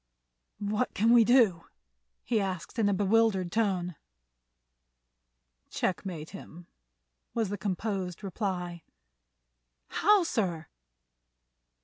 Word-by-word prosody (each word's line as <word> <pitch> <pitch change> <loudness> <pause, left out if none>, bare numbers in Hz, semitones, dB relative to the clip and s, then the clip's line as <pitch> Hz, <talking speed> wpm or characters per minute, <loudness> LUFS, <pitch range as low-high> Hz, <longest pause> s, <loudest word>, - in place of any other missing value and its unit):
"What 210 +4 -2
can 225 +3 +3
we 235 -1 +7
do?" 220 -8 +4 0.6
he 225 -3 +1
asked 190 +3 -4
in 205 -2 +3
a - - +2
bewildered 200 -2 +2
tone. 185 -7 0 1.7
"Checkmate 175 -4 -3
him," 175 -3 -11 0.7
was 225 -4 0
the 205 - -2
composed 195 -2 -3
reply. 180 -3 -3 1.1
"How, 415 -2 +4
sir?" 180 - -2
195 Hz, 90 wpm, -29 LUFS, 180-225 Hz, 1.7 s, we